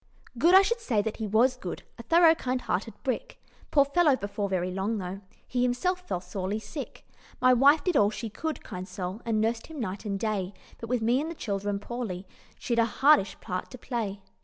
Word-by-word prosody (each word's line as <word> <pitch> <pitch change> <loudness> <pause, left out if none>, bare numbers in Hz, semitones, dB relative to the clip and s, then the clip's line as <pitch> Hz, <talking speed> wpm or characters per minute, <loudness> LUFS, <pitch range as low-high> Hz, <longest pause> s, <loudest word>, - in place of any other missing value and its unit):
"Good? 335 +10 +5
I 385 - +9
should 470 +4 0
say 225 - 0
that 220 0 -3
he 220 - -3
was 235 +5 +3
good, 185 -8 -6 0.2
A - - -4
thorough 330 +6 +6
kind 255 -5 -2
hearted - - -2
brick - - -3 0.3
Poor 280 -2 +5
fellow! 295 0 +4
before 200 -2 -3
very 185 -1 -1
long 195 +4 -1
though, 190 0 -5 0.3
He 245 - -1
himself 250 +10 +1
fell 360 - -3
sorely 190 +2 -3
sick. 275 +6 -8 0.3
My 255 0 +5
wife 285 +5 +5
did 360 -3 0
all 205 -6 +5
she 225 +2 -5
could, 315 +9 -4
kind 185 +1 -7
soul, 185 +2 -5
And 225 -2 +1
nursed 225 +1 0
him 320 -2 -8
night 195 -3 -4
and 200 -3 -3
day; 200 -3 -2 0.2
But 230 - -7
with 245 -2 0
me 245 +4 +3
and 315 - -3
the 335 - -6
children 205 -4 -2
poorly, 205 -4 -5 0.3
She'd 235 -1 -1
a 230 - +5
hardish 250 -2 +3
part 185 0 -4
to 255 - -9
play. 215 -6 -4
230 Hz, 210 wpm, -28 LUFS, 200-275 Hz, 0.3 s, I